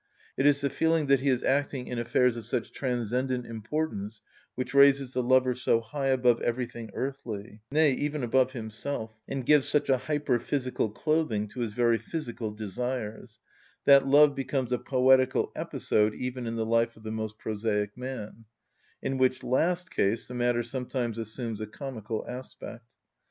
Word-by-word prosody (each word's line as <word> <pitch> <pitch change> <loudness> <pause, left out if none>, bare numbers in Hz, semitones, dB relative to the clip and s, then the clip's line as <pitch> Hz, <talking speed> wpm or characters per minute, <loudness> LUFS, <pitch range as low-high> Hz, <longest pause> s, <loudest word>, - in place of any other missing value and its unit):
It 135 - +3
is 145 -1 +4
the 140 - 0
feeling 160 -1 +2
that 140 -1 +4
he 140 +2 +1
is 125 -2 +1
acting 135 -1 0
in 125 -1 -4
affairs 120 +1 +2
of 115 -2 -7
such 120 0 -2
transcendent 125 0 -1
importance 115 -2 -4 0.3
which 130 +1 -4
raises 140 -1 +5
the 125 - +1
lover 130 +1 +3
so 120 -2 +2
high 135 +5 -4
above 125 -3 +3
everything 120 -1 -3
earthly, 115 -6 -5
nay, 155 0 +4
even 145 +1 -2
above 130 +2 +2
himself, 110 0 -4
and 135 -2 -4
gives 150 -1 +4
such 145 -2 +1
a 130 - +3
hyperphysical 130 -4 -1
clothing 155 -10 0
to 105 - -9
his 115 -3 -2
very 120 -1 +2
physical 120 -3 -4
desires, 110 +2 -5 0.5
that 140 -1 +7
love 145 +1 +6
becomes 135 -2 -2
a 125 - +1
poetical 130 0 +3
episode 105 0 0
even 125 -1 -4
in 115 - -3
the 115 -1 -1
life 115 0 +1
of 110 - -16
the 110 - -5
most 110 -1 -4
prosaic 105 -2 -2
man; 125 -3 -7 0.6
in 135 0 -1
which 130 0 +2
last 175 +7 0
case 110 -6 0
the - - -8
matter 120 -1 +1
sometimes 120 -2 -3
assumes 115 0 -4
a 110 - -4
comical 110 -3 -5
aspect. 125 -2 -8
125 Hz, 165 wpm, -28 LUFS, 115-135 Hz, 0.6 s, that